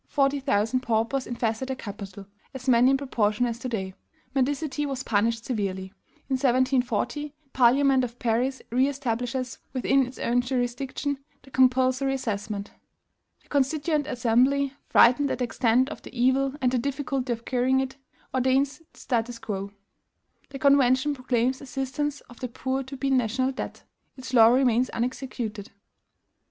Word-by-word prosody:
forty 280 Hz, 0 st, +1 dB
thousand 255 Hz, -2 st, +1 dB
paupers 235 Hz, +2 st, 0 dB
infested 235 Hz, +1 st, -2 dB
the 265 Hz, -, -2 dB
capital 200 Hz, -4 st, -8 dB, 0.3 s
[as 260 Hz, 0 st, -8 dB
many 250 Hz, 0 st, +5 dB
in 270 Hz, -, +4 dB
proportion 235 Hz, -4 st, 0 dB
as 235 Hz, -1 st, -3 dB
to 255 Hz, -, -4 dB
day]. 190 Hz, -5 st, -3 dB, 0.4 s
Mendicity 285 Hz, +2 st, 0 dB
was 270 Hz, -2 st, -3 dB
punished 225 Hz, +1 st, 0 dB
severely. 190 Hz, -5 st, -3 dB, 0.3 s
In 265 Hz, -, 0 dB
1740, 260 Hz, +1 st, +1 dB, 0.2 s
the 275 Hz, -, -37 dB
Parliament 265 Hz, +1 st, +4 dB
of 240 Hz, -1 st, -5 dB
Paris 245 Hz, +3 st, 0 dB
re 255 Hz, +3 st, +3 dB
establishes 255 Hz, -2 st, -3 dB
within 265 Hz, 0 st, +2 dB
its 255 Hz, -, -11 dB
own 245 Hz, +1 st, +1 dB
jurisdiction 260 Hz, +3 st, -2 dB, 0.2 s
the 270 Hz, -, -17 dB
compulsory 260 Hz, +1 st, +3 dB
assessment. 205 Hz, -4 st, -4 dB, 0.7 s
"The -, -, -29 dB
Constituent 290 Hz, +2 st, +1 dB
Assembly, 260 Hz, +2 st, +2 dB
frightened 265 Hz, +4 st, +5 dB
at -, -, -1 dB
the 255 Hz, -, -1 dB
extent 240 Hz, +1 st, +2 dB
of -, -, -8 dB
the 245 Hz, -, -10 dB
evil 265 Hz, +2 st, +2 dB
and 250 Hz, -1 st, +2 dB
the 255 Hz, -, +1 dB
difficulty 270 Hz, -1 st, -2 dB
of 230 Hz, 0 st, -4 dB
curing 260 Hz, +1 st, +2 dB
it, 265 Hz, 0 st, -3 dB, 0.4 s
ordains 265 Hz, +3 st, +1 dB
the -, -, -24 dB
statu 240 Hz, -1 st, -1 dB
quo. 200 Hz, -2 st, -4 dB, 0.8 s
"The 275 Hz, -, -7 dB
Convention 275 Hz, 0 st, +4 dB
proclaims 255 Hz, -1 st, 0 dB
assistance 275 Hz, +2 st, -3 dB
of 240 Hz, -, -16 dB
the 250 Hz, -, -3 dB
poor 260 Hz, +2 st, -2 dB
to 270 Hz, +1 st, -8 dB
be 275 Hz, +1 st, -1 dB
a -, -, 0 dB
NATIONAL 255 Hz, +1 st, +1 dB
DEBT. 260 Hz, -, -6 dB, 0.3 s
Its 260 Hz, 0 st, -8 dB
law 225 Hz, -3 st, +8 dB
remains 250 Hz, 0 st, +3 dB
unexecuted. 235 Hz, -4 st, -4 dB
255 Hz, 155 wpm, -26 LUFS, 235-270 Hz, 0.8 s, law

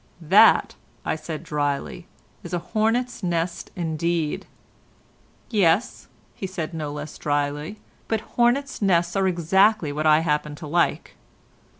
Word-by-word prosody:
"That," -, -, +6 dB, 0.4 s
said 155 Hz, -1 st, -6 dB
I -, -, -16 dB
drily, 145 Hz, -3 st, -3 dB, 0.3 s
"is -, -, -5 dB
a 175 Hz, -, -6 dB
hornet's 235 Hz, +3 st, 0 dB
nest 170 Hz, -1 st, -2 dB
indeed." 165 Hz, -2 st, -2 dB, 1.0 s
"Yes," 200 Hz, 0 st, +1 dB, 0.4 s
said 175 Hz, -4 st, -5 dB
he 165 Hz, -, -7 dB
no 150 Hz, -2 st, -4 dB
less 145 Hz, +1 st, -7 dB
drily, 145 Hz, +5 st, -2 dB, 0.3 s
"but 225 Hz, -2 st, 0 dB
hornet's 245 Hz, +3 st, +1 dB
nests 175 Hz, -3 st, +2 dB
are 195 Hz, -1 st, +2 dB
exactly 185 Hz, 0 st, +3 dB
what 155 Hz, +2 st, -1 dB
I 155 Hz, +1 st, +5 dB
happen 150 Hz, -2 st, -1 dB
to 155 Hz, -, -9 dB
like. 170 Hz, +3 st, 0 dB
170 Hz, 125 wpm, -24 LUFS, 150-195 Hz, 1.0 s, That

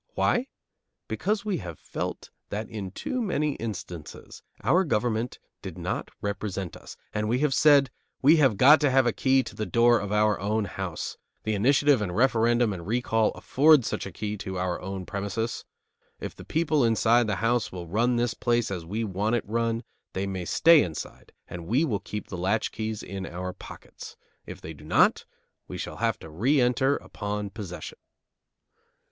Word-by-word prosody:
Why? 245 Hz, +2 st, +2 dB, 0.6 s
Because 210 Hz, 0 st, -1 dB
we 205 Hz, -3 st, 0 dB
have 85 Hz, -5 st, -7 dB
felt -, -, -5 dB, 0.2 s
that 105 Hz, +2 st, -4 dB
in 100 Hz, -4 st, -6 dB
too 250 Hz, -, -3 dB
many 150 Hz, -8 st, 0 dB
instances 90 Hz, -8 st, -7 dB, 0.2 s
our 185 Hz, +3 st, +4 dB
government 120 Hz, -, -1 dB, 0.2 s
did -, -, -7 dB
not -, -, -3 dB
represent 100 Hz, -3 st, -3 dB
us, -, -, -11 dB, 0.2 s
and 105 Hz, 0 st, -1 dB
we 120 Hz, -, +2 dB
have 150 Hz, -3 st, +2 dB
said: 140 Hz, -3 st, +5 dB, 0.3 s
"We 150 Hz, +5 st, +6 dB
have 135 Hz, -9 st, +4 dB
got 145 Hz, +7 st, +7 dB
to 145 Hz, -, +4 dB
have 135 Hz, 0 st, +4 dB
a 120 Hz, -, +2 dB
key 130 Hz, 0 st, +3 dB
to -, -, -9 dB
the 110 Hz, -, -3 dB
door 120 Hz, 0 st, +4 dB
of 100 Hz, 0 st, -5 dB
our 105 Hz, 0 st, +2 dB
own 105 Hz, +2 st, 0 dB
house. 95 Hz, -4 st, -5 dB, 0.3 s
The 110 Hz, -, -1 dB
initiative 135 Hz, +4 st, +3 dB
and 90 Hz, -4 st, -3 dB
referendum 120 Hz, -2 st, +3 dB
and 90 Hz, -, -6 dB
the 85 Hz, -, -10 dB
recall 115 Hz, 0 st, +1 dB
afford 145 Hz, -2 st, +4 dB
such -, -, -3 dB
a -, -, -8 dB
key 105 Hz, +3 st, -4 dB
to 95 Hz, -1 st, -5 dB
our 90 Hz, -1 st, -2 dB
own 95 Hz, 0 st, -5 dB
premises. 100 Hz, +4 st, -3 dB, 0.5 s
If -, -, -6 dB
the -, -, -11 dB
people 155 Hz, -3 st, +1 dB
inside 115 Hz, +1 st, +3 dB
the 105 Hz, -, 0 dB
house 115 Hz, +3 st, 0 dB
will 90 Hz, -2 st, -6 dB
run 115 Hz, +8 st, +1 dB
the 120 Hz, -1 st, 0 dB
place 120 Hz, -3 st, +1 dB
as 90 Hz, -3 st, -4 dB
we 105 Hz, +8 st, -3 dB
want 105 Hz, +3 st, 0 dB
it 120 Hz, -, -1 dB
run, 115 Hz, +1 st, -1 dB, 0.3 s
they 95 Hz, +1 st, -2 dB
may 95 Hz, -2 st, -4 dB
stay 165 Hz, -, +6 dB
inside 80 Hz, -3 st, -6 dB, 0.2 s
and 85 Hz, -1 st, -8 dB
we 130 Hz, -, +2 dB
will 110 Hz, -9 st, -1 dB
keep 105 Hz, +1 st, -6 dB
the 90 Hz, -, -6 dB
latchkeys 110 Hz, +2 st, -1 dB
in 95 Hz, 0 st, -6 dB
our 90 Hz, +1 st, -5 dB
pockets. -, -, -11 dB, 0.3 s
If -, -, -9 dB
they 80 Hz, -, -7 dB
do 75 Hz, -, -15 dB
not, 75 Hz, -, +3 dB, 0.4 s
we -, -, -6 dB
shall -, -, -6 dB
have -, -, 0 dB
to 80 Hz, -, -9 dB
re 125 Hz, -, +2 dB
enter 125 Hz, +3 st, +3 dB
upon 105 Hz, -1 st, -5 dB
possession." 95 Hz, -5 st, -8 dB
110 Hz, 185 wpm, -27 LUFS, 95-125 Hz, 0.6 s, got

